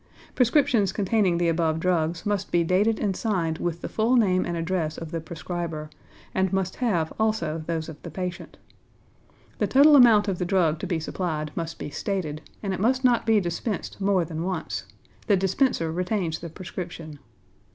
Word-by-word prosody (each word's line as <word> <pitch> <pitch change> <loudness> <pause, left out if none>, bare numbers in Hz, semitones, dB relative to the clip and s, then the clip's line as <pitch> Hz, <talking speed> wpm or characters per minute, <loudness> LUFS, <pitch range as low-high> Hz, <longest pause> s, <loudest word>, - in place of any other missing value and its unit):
Prescriptions 245 - +3
containing 195 -3 +1
the 170 0 +1
above 165 -1 +1
drugs 165 -1 0
must 205 -2 -1
be 170 -1 +3
dated 200 +6 +2
and 195 -3 0
signed 175 -7 -1
with 170 -1 -2
the - - -4
full 225 +3 +1
name 190 -6 +3
and 170 -1 -2
address 165 -2 -2
of 165 -1 -7
the 165 - -3
prescriber, 160 -1 -5 0.4
and 190 0 +1
must 190 -1 -1
have 180 -11 0
also 170 -8 0
those 165 -2 -2
of 160 -3 -10
the - - -7
patient. 180 -2 -6 1.0
The - - +2
total 290 +3 +7
amount 225 -6 +7
of 190 -3 -1
the - - 0
drug 175 -4 +2
to - - -4
be 170 - -1
supplied 155 -2 -3
must 165 -1 -4
be - - -6
stated, 155 -2 -3 0.2
and 195 -2 -1
it 185 - -4
must 255 +6 +2
not 245 -3 +3
be 220 -1 +5
dispensed 200 +4 -4
more 195 -3 +2
than 160 0 -5
once; 180 -2 -3 0.4
the 205 -3 +4
dispenser 190 - +1
retains 180 -1 -1
the 170 - -7
prescription. 170 -3 -7
180 Hz, 180 wpm, -25 LUFS, 165-205 Hz, 1.0 s, total